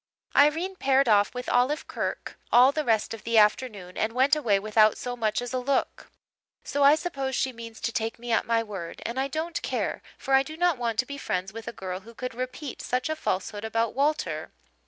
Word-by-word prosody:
Irene 325 Hz, +7 st, +3 dB
paired 270 Hz, -2 st, +3 dB
off 205 Hz, -2 st, +4 dB
with 250 Hz, 0 st, -5 dB
Olive 255 Hz, +5 st, +1 dB
Kirk -, -, -4 dB, 0.2 s
all 250 Hz, +3 st, +7 dB
the 305 Hz, +1 st, -1 dB
rest 225 Hz, -3 st, +1 dB
of 225 Hz, -, -9 dB
the 230 Hz, 0 st, +1 dB
afternoon 210 Hz, -4 st, +2 dB
and 220 Hz, +1 st, 0 dB
went 265 Hz, +4 st, +4 dB
away 230 Hz, -10 st, +2 dB
without 215 Hz, +1 st, +3 dB
so 245 Hz, 0 st, -4 dB
much 225 Hz, 0 st, -1 dB
as 245 Hz, -, -6 dB
a 255 Hz, -, 0 dB
look. 265 Hz, +2 st, -1 dB, 0.5 s
So 285 Hz, -, -2 dB
I 280 Hz, +2 st, +7 dB
suppose 275 Hz, -6 st, -3 dB
she 260 Hz, +1 st, 0 dB
means 230 Hz, -1 st, -9 dB
to 230 Hz, -, -1 dB
take 225 Hz, 0 st, -2 dB
me 240 Hz, 0 st, -6 dB
at 225 Hz, -, +2 dB
my 230 Hz, -1 st, +2 dB
word 195 Hz, -6 st, -7 dB
and 235 Hz, +3 st, -3 dB
I 270 Hz, -, +1 dB
don't 320 Hz, +4 st, -3 dB
care, -, -, -2 dB, 0.2 s
for 270 Hz, -, -3 dB
I 270 Hz, -, +7 dB
do 310 Hz, +4 st, -7 dB
not 350 Hz, -5 st, +2 dB
want 230 Hz, -2 st, -1 dB
to 255 Hz, -, +2 dB
be 280 Hz, +2 st, -7 dB
friends 185 Hz, -1 st, -3 dB
with 225 Hz, 0 st, -8 dB
a -, -, -2 dB
girl 185 Hz, -4 st, -5 dB
who 230 Hz, +4 st, -15 dB
could 250 Hz, 0 st, -5 dB
repeat 255 Hz, +3 st, -5 dB
such 255 Hz, +3 st, -1 dB
a 315 Hz, -, 0 dB
falsehood 205 Hz, -5 st, -3 dB
about 225 Hz, 0 st, 0 dB
Walter. 295 Hz, +3 st, -1 dB
245 Hz, 220 wpm, -27 LUFS, 220-275 Hz, 0.5 s, all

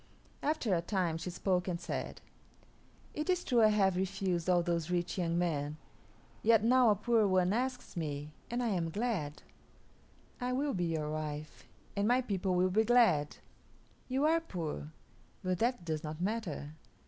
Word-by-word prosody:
After 290 Hz, -9 st, 0 dB
a 170 Hz, -, +2 dB
time 175 Hz, -3 st, -1 dB
she 165 Hz, -, -4 dB
spoke 180 Hz, 0 st, 0 dB
and 175 Hz, -2 st, -2 dB
said, -, -, -5 dB, 0.9 s
"It 305 Hz, +4 st, -3 dB
is 360 Hz, -1 st, +2 dB
true 245 Hz, -3 st, +3 dB
I 215 Hz, -, +7 dB
have 200 Hz, -3 st, +3 dB
refused 185 Hz, -2 st, -1 dB
all 175 Hz, -1 st, +4 dB
those 170 Hz, -1 st, -1 dB
rich 175 Hz, +1 st, -1 dB
young 170 Hz, -1 st, 0 dB
men; 150 Hz, -4 st, -1 dB, 0.6 s
yet 225 Hz, -1 st, +5 dB
now 250 Hz, +1 st, +5 dB
a 210 Hz, -, +5 dB
poor 220 Hz, +1 st, +2 dB
one 185 Hz, 0 st, +3 dB
asks 250 Hz, 0 st, -2 dB
me, 150 Hz, -3 st, -4 dB, 0.2 s
and 240 Hz, +1 st, -1 dB
I 235 Hz, -, +1 dB
am 175 Hz, -5 st, 0 dB
glad. 185 Hz, -7 st, -2 dB, 1.0 s
I 250 Hz, 0 st, -1 dB
will 280 Hz, +2 st, 0 dB
be 180 Hz, -2 st, 0 dB
your 155 Hz, -2 st, -2 dB
wife, 155 Hz, -1 st, -5 dB, 0.3 s
and 200 Hz, 0 st, +1 dB
my 245 Hz, +2 st, +4 dB
people 190 Hz, -5 st, -1 dB
will 185 Hz, +1 st, +3 dB
be 220 Hz, +4 st, +4 dB
glad. 220 Hz, -12 st, +3 dB, 0.7 s
You 265 Hz, +3 st, +1 dB
are 325 Hz, +2 st, +4 dB
poor, 155 Hz, -, -5 dB, 0.5 s
but 185 Hz, -1 st, -1 dB
that 235 Hz, -6 st, 0 dB
does 155 Hz, -2 st, -2 dB
not 155 Hz, 0 st, -5 dB
matter. 180 Hz, -7 st, -3 dB
185 Hz, 170 wpm, -33 LUFS, 165-230 Hz, 1.0 s, I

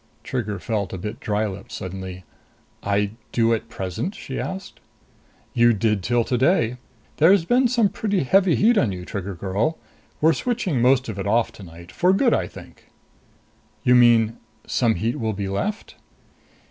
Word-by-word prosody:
Trigger 105 Hz, -5 st, -3 dB
felt 100 Hz, -5 st, -3 dB
a -, -, -3 dB
bit 105 Hz, +5 st, -6 dB
dry 105 Hz, 0 st, -1 dB
lipped 100 Hz, -1 st, -7 dB
suddenly. 95 Hz, 0 st, -6 dB, 0.6 s
"I 100 Hz, 0 st, 0 dB, 0.2 s
do 115 Hz, -1 st, +2 dB
at 115 Hz, 0 st, -3 dB
present?" 95 Hz, -, -4 dB
she -, -, -6 dB
asked. 190 Hz, 0 st, -6 dB, 0.7 s
"You 120 Hz, 0 st, +5 dB
did 105 Hz, -1 st, 0 dB
till 120 Hz, +4 st, +1 dB
today. 125 Hz, -1 st, +1 dB, 0.4 s
There's 165 Hz, +3 st, +5 dB
been 250 Hz, +6 st, +3 dB
some 235 Hz, -3 st, +3 dB
pretty 200 Hz, -3 st, -1 dB
heavy 185 Hz, +4 st, +3 dB
heat 220 Hz, +1 st, +4 dB
on 115 Hz, -, +1 dB
you, 90 Hz, -1 st, -6 dB
Trigger 100 Hz, 0 st, -5 dB
girl. 100 Hz, -, -1 dB, 0.4 s
We're 160 Hz, +2 st, +4 dB
switching 205 Hz, -, -1 dB
most 130 Hz, +1 st, +3 dB
of 105 Hz, -3 st, -5 dB
it 100 Hz, -, -3 dB
off 115 Hz, +3 st, +2 dB
tonight. 85 Hz, -2 st, -12 dB
For 180 Hz, +2 st, +2 dB
good, 235 Hz, +4 st, +3 dB
I -, -, 0 dB
think." -, -, -14 dB, 0.9 s
"You 125 Hz, -3 st, +4 dB
mean 115 Hz, -2 st, +5 dB, 0.3 s
some 115 Hz, -3 st, +1 dB
heat 115 Hz, +3 st, -2 dB
will 110 Hz, -2 st, -1 dB
be 100 Hz, 0 st, -4 dB
left?" 200 Hz, -, -3 dB
115 Hz, 160 wpm, -23 LUFS, 100-165 Hz, 0.9 s, You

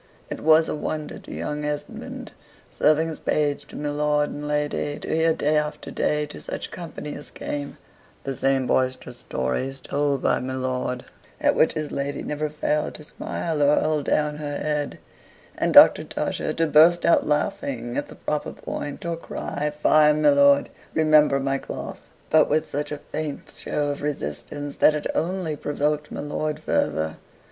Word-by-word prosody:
It -, -, -4 dB
was 160 Hz, +1 st, +5 dB
a -, -, -2 dB
wonder 150 Hz, 0 st, -4 dB
to -, -, -12 dB
young 150 Hz, 0 st, -3 dB
Esmond, 150 Hz, 0 st, -5 dB, 0.4 s
serving 155 Hz, +2 st, +3 dB
as 160 Hz, -, -6 dB
page 145 Hz, -1 st, 0 dB
to -, -, -12 dB
my 145 Hz, 0 st, -3 dB
lord 150 Hz, 0 st, +1 dB
and 150 Hz, 0 st, -5 dB
lady, 150 Hz, 0 st, -1 dB
to -, -, -8 dB
hear, 160 Hz, 0 st, +3 dB
day 155 Hz, -1 st, +1 dB
after 150 Hz, 0 st, -2 dB
day, 150 Hz, 0 st, +1 dB
to 150 Hz, -, -9 dB
such -, -, -5 dB
company 160 Hz, -4 st, -6 dB
as 145 Hz, -, -8 dB
came, 145 Hz, -1 st, -5 dB, 0.5 s
the 135 Hz, -, -3 dB
same 135 Hz, 0 st, +1 dB
boisterous 130 Hz, 0 st, 0 dB
stories 130 Hz, -, -2 dB
told 140 Hz, 0 st, -1 dB
by -, -, +3 dB
my 130 Hz, +1 st, -4 dB
lord, 130 Hz, -1 st, -2 dB, 0.3 s
at -, -, +3 dB
which -, -, +3 dB
his 155 Hz, -1 st, -3 dB
lady 140 Hz, +1 st, -3 dB
never 150 Hz, +1 st, -2 dB
failed 150 Hz, 0 st, -1 dB
to 155 Hz, -, -8 dB
smile 155 Hz, 0 st, -3 dB
or 145 Hz, +1 st, +5 dB
hold 155 Hz, -2 st, 0 dB
down 150 Hz, -1 st, +1 dB
her 145 Hz, -1 st, -4 dB
head, 150 Hz, -1 st, -2 dB, 0.6 s
and -, -, 0 dB
Doctor -, -, +8 dB
Tusher -, -, -2 dB
to 165 Hz, -, +1 dB
burst 160 Hz, +3 st, +5 dB
out 170 Hz, -, +4 dB
laughing 140 Hz, -6 st, -1 dB
at 145 Hz, -, -2 dB
the -, -, -12 dB
proper 150 Hz, -1 st, -3 dB
point, 145 Hz, +2 st, -6 dB
or 170 Hz, 0 st, -1 dB
cry, 150 Hz, -2 st, -4 dB
"Fie, 150 Hz, 0 st, +4 dB
my 150 Hz, 0 st, +4 dB
lord, 140 Hz, 0 st, +5 dB, 0.2 s
remember 155 Hz, -3 st, +5 dB
my 135 Hz, 0 st, 0 dB
cloth!" -, -, -7 dB, 0.2 s
but 155 Hz, -1 st, +5 dB
with 155 Hz, +1 st, +1 dB
such 145 Hz, +1 st, -3 dB
a 150 Hz, -, -3 dB
faint 155 Hz, -2 st, -4 dB
show 145 Hz, -1 st, -2 dB
of 145 Hz, -, -6 dB
resistance, 145 Hz, -, -4 dB
that 155 Hz, -, +5 dB
it 150 Hz, -, -4 dB
only 170 Hz, -2 st, -1 dB
provoked 150 Hz, +1 st, -1 dB
my -, -, -4 dB
lord 150 Hz, +1 st, -2 dB
further. 80 Hz, -, 0 dB
150 Hz, 175 wpm, -24 LUFS, 140-155 Hz, 0.6 s, Doctor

